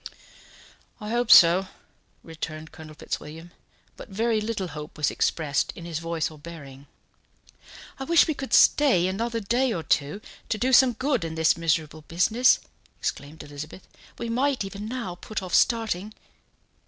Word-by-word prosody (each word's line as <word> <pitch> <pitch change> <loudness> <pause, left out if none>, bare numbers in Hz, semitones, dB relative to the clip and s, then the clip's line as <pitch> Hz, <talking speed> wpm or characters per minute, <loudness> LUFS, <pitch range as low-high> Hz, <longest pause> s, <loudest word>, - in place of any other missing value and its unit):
"I 210 0 -6
hope 240 0 0
so," 175 +1 +7 0.6
returned 160 -1 -7
Colonel 155 -1 -12
Fitzwilliam; 160 +3 -7 0.5
but - - -11
very 220 +2 0
little 210 -4 -3
hope 150 0 -9
was 150 - +1
expressed 150 -4 0
in 170 - -9
his 165 -2 -4
voice 165 -1 -2
or 155 - -14
bearing. 145 -4 -11 1.1
"I 270 - -4
wish 335 +3 +5
we 315 - 0
could 275 -2 -7
stay 260 -12 +5
another 230 +5 -2
day 240 +5 +1
or 170 -7 -3
two, 150 +7 0 0.3
to 220 - 0
do 255 +4 0
some 255 0 +6
good 260 - -1
in 160 -1 -5
this 160 0 +3
miserable 160 -1 -1
business," 220 +9 +3 0.4
exclaimed 145 +3 -5
Elizabeth. 150 +5 -10 0.3
"We 235 - -4
might 255 +2 0
even 200 +2 -7
now 235 -6 -4
put 215 -3 -5
off 180 - -7
starting." 215 -3 +1
185 Hz, 155 wpm, -25 LUFS, 160-230 Hz, 1.1 s, so